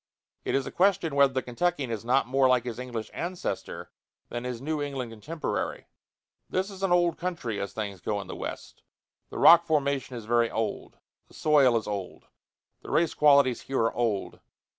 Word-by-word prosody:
It - - -1
is 135 -1 0
a - - -6
question 185 -4 +2
whether 140 -1 +4
the 130 - -1
Kentuckian 135 0 -1
is 110 -2 -4
not 125 +3 +2
more 130 +2 +3
like 125 -2 +3
his 120 -1 -5
English 120 -3 -5
ancestor 175 +1 -5 0.4
than 120 +1 -5
his 125 -2 -4
New 150 +3 -2
England 135 -5 -4
contemporary. 150 +9 -4 0.6
This 190 +2 -1
is 195 -1 -10
an 195 -2 0
old 175 -2 +3
country, 170 - -3
as 100 0 -4
things 100 -4 -5
go 105 +2 -2
in 100 - -6
the - - -7
West. - - -7 0.5
The - - -8
rock 170 0 +8
formation 140 -4 0
is 115 -3 -7
very 120 0 +2
old; 110 -1 -4 0.3
the - - -19
soil 140 -6 +4
is 110 - -3
old; 100 -3 -5 0.6
the - - -11
race 170 0 +2
qualities 140 -4 +4
here 135 - -4
are 115 - +1
old. 115 -5 -2
130 Hz, 185 wpm, -27 LUFS, 115-155 Hz, 0.6 s, rock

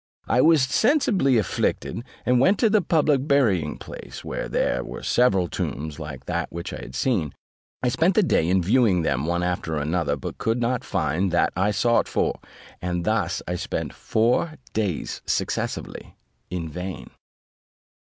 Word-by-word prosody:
I 125 - +3
was 160 -2 +5
sensibly 195 - +3
afflicted, 110 +2 -1 0.2
and 125 0 +3
went 190 +10 +4
to 225 -3 +3
the 215 -1 +4
public 150 -5 +2
burying 105 - +2
place, - - -9
where - - -4
there - - 0
were - - -8
several 95 -8 +3
tombs 75 -2 -4
like - - -7
that 85 -1 -2
which 85 0 -6
I - - -5
had 60 +1 -9
seen: 90 - 0 0.5
I 125 - +3
spent 165 +9 +2
the 215 - +5
day 85 - +2
in 95 0 +3
viewing 100 -3 +3
them 70 -1 0
one 85 +1 0
after 90 -3 -2
another, 75 0 0
but 70 - -7
could 115 +2 0
not 120 0 0
find 80 +5 0
that 85 - +2
I 95 +3 +2
sought 115 +4 +2
for, - - 0 0.4
and 90 -1 -2
thus - - 0
I 90 - -1
spent - - -3
four 125 +9 +1 0.2
days 100 -8 -2
successively - - -3 0.3
in 85 -2 -3
vain. 90 +3 -6
100 Hz, 165 wpm, -24 LUFS, 85-130 Hz, 0.5 s, was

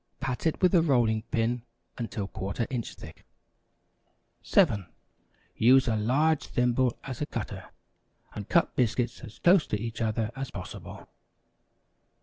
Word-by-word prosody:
Pat 135 +2 -2
it 160 - -2
with 180 - +6
the 175 - +5
rolling 120 -8 +2
pin 115 +1 0 0.3
until 115 -4 -4
¼ 100 +4 -3
inch 120 -3 -4
thick. - - -12 1.2
7. 100 -4 +3 0.7
Use 130 +3 +5
a 115 - +2
large 140 +9 +2
thimble 125 0 +1
as 130 -1 -6
a 150 - -1
cutter, - - -6 0.6
and - - -7
cut - - +2
biscuits 120 0 0
as 110 - -11
close 175 -1 +4
to 105 - -1
each 115 +1 -5
other 110 0 0
as 135 -1 -4
possible. 90 - -9
120 Hz, 135 wpm, -28 LUFS, 110-135 Hz, 1.2 s, with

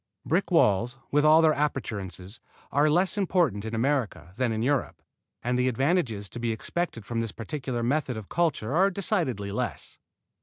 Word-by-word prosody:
Brick - - +1
walls, 115 +6 +3
with 150 +1 +3
all 155 +2 +6
their 160 - +6
appurtenances, 105 - -3 0.3
are 145 +2 +3
less 180 +6 +2
important 170 - +1
in 110 +1 -3
America 120 -7 -1
than 125 0 0
in 110 0 -1
Europe 135 0 0 0.4
and 125 +1 0
the 125 - +2
advantages 130 - 0
to 120 - -7
be 120 -1 -1
expected 115 - -3
from 115 0 -2
this 115 -2 -3
particular 120 +1 -4
method 130 -1 0
of 105 -3 -8
culture 155 -8 0
are 190 +3 +5
decidedly 170 - -1
less. 100 - -4
125 Hz, 165 wpm, -27 LUFS, 110-155 Hz, 0.4 s, all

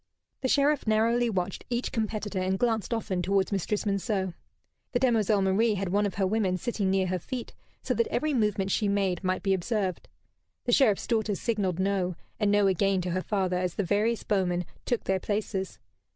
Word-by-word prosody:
The 260 - +1
Sheriff 285 0 +2
narrowly 230 +2 +3
watched 190 -2 -2
each 240 0 -1
competitor, 215 -3 -2
and 185 +1 0
glanced 225 -1 0
often 215 -5 -1
towards 195 +2 +1
Mistress 200 +2 -1
Monceux. 200 -2 -1 0.6
The 245 - +2
demoiselle 220 -5 +3
Marie 210 +3 +2
had 195 -1 -2
one 205 +2 +2
of 200 - -6
her 195 - +1
women 190 -2 +1
sitting 205 -2 -1
near 190 0 +2
her 185 0 -1
feet, 245 +7 -6 0.3
so - - 0
that 465 - +1
every 310 -8 0
movement 210 -5 +1
she 210 - +1
made 195 -2 0
might 185 0 -1
be 195 -2 +2
observed. 190 0 -2 0.6
The 245 - +1
Sheriff's 230 -6 +4
daughter 220 -3 0
signalled 200 -6 -1
"No," 190 -2 0 0.2
and 210 -2 +2
"No" 205 0 +4
again 195 0 +2
to 180 0 -3
her 185 +2 0
father 185 -3 0
as 180 -1 -2
the 205 - 0
various 210 +5 +1
bowmen 180 -3 0 0.2
took 240 - 0
their 190 0 0
places. 200 -2 -3
200 Hz, 190 wpm, -28 LUFS, 190-225 Hz, 0.6 s, Sheriff's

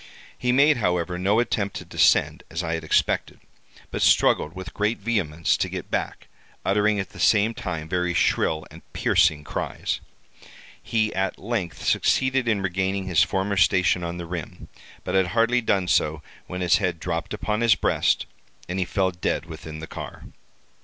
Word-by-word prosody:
He 125 - 0
made, 140 +3 +5
however, 90 -4 -1
no 100 +4 +2
attempt 100 -4 -1
to - - -6
descend - - +3
as 85 +3 -3
I 80 0 -2
had 80 -1 -3
expected, 80 - 0 0.5
but - - -3
struggled 80 +4 +3
with 95 -3 -8
great 105 +3 0
vehemence 90 -8 0
to - - -1
get - - -6
back, - - -3 0.4
uttering 105 +1 +2
at 95 - -4
the 100 - -13
same 105 +5 +3
time 85 -7 -5
very 90 0 -1
shrill 80 -2 +1
and - - -12
piercing 75 -1 +2
cries. - - -3 0.8
He 110 -1 0
at 95 0 -1
length 100 -8 -4
succeeded 130 -1 +2
in 105 -4 +1
regaining 95 +1 -1
his 90 -4 +3
former 95 0 0
station 90 +1 +3
on 85 0 -4
the 85 - -5
rim, 85 -2 -7 0.3
but 90 - -4
had 95 -1 +3
hardly 120 +2 +3
done 100 -5 +1
so 80 -2 +1 0.2
when 90 0 -5
his 90 -2 +4
head 90 -4 -1
dropped 85 -1 -3
upon 105 +1 -2
his 115 -4 +5
breast, - - +1 0.4
and 90 +2 -3
he 95 - +1
fell 95 +1 0
dead 85 -2 -2
within 80 -1 -9
the - - -5
car. - - -8
95 Hz, 175 wpm, -24 LUFS, 85-105 Hz, 0.8 s, made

